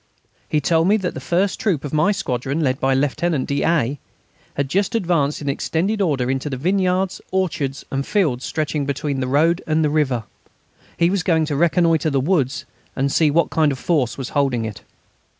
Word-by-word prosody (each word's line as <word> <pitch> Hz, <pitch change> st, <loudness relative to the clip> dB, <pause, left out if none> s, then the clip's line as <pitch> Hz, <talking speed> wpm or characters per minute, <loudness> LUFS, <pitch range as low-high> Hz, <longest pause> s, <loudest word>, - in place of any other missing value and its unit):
He 150 Hz, -, +2 dB
told 165 Hz, +3 st, +2 dB
me 210 Hz, +2 st, +4 dB
that 190 Hz, -4 st, -3 dB
the -, -, -6 dB
first 185 Hz, +3 st, 0 dB
troop 175 Hz, -10 st, 0 dB
of 145 Hz, -, -6 dB
my 155 Hz, +6 st, +3 dB
squadron, 140 Hz, -, -2 dB
led 130 Hz, -3 st, 0 dB
by 135 Hz, 0 st, +2 dB
Lieutenant 145 Hz, +2 st, 0 dB
d'A., 140 Hz, -2 st, 0 dB, 0.6 s
had 140 Hz, -1 st, -1 dB
just 195 Hz, +9 st, 0 dB
advanced, 165 Hz, -8 st, 0 dB
in -, -, -6 dB
extended 180 Hz, +9 st, -1 dB
order, 135 Hz, -8 st, +1 dB
into 135 Hz, +2 st, -2 dB
the 135 Hz, -, -3 dB
vineyards, 185 Hz, +4 st, 0 dB
orchards, 155 Hz, -8 st, -2 dB
and 135 Hz, 0 st, -1 dB
fields 145 Hz, -, 0 dB
stretching 150 Hz, -2 st, -2 dB
between 140 Hz, 0 st, -2 dB
the 130 Hz, -, -1 dB
road 160 Hz, +6 st, +2 dB
and 155 Hz, 0 st, +2 dB
the 150 Hz, -, +1 dB
river. 135 Hz, -7 st, +1 dB, 0.7 s
He 170 Hz, +1 st, +3 dB
was 195 Hz, -1 st, +1 dB
going 160 Hz, -2 st, +2 dB
to 150 Hz, -2 st, -2 dB
reconnoitre 165 Hz, 0 st, +2 dB
the 140 Hz, -2 st, +1 dB
woods 140 Hz, -4 st, 0 dB, 0.3 s
and 135 Hz, +1 st, 0 dB
see 155 Hz, +1 st, +3 dB
what 165 Hz, +3 st, +2 dB
kind 155 Hz, -2 st, +2 dB
of 135 Hz, -, -4 dB
force 135 Hz, -4 st, 0 dB
was 135 Hz, -3 st, -5 dB
holding 135 Hz, -6 st, 0 dB
it. 110 Hz, -3 st, -7 dB
150 Hz, 190 wpm, -21 LUFS, 135-175 Hz, 0.7 s, me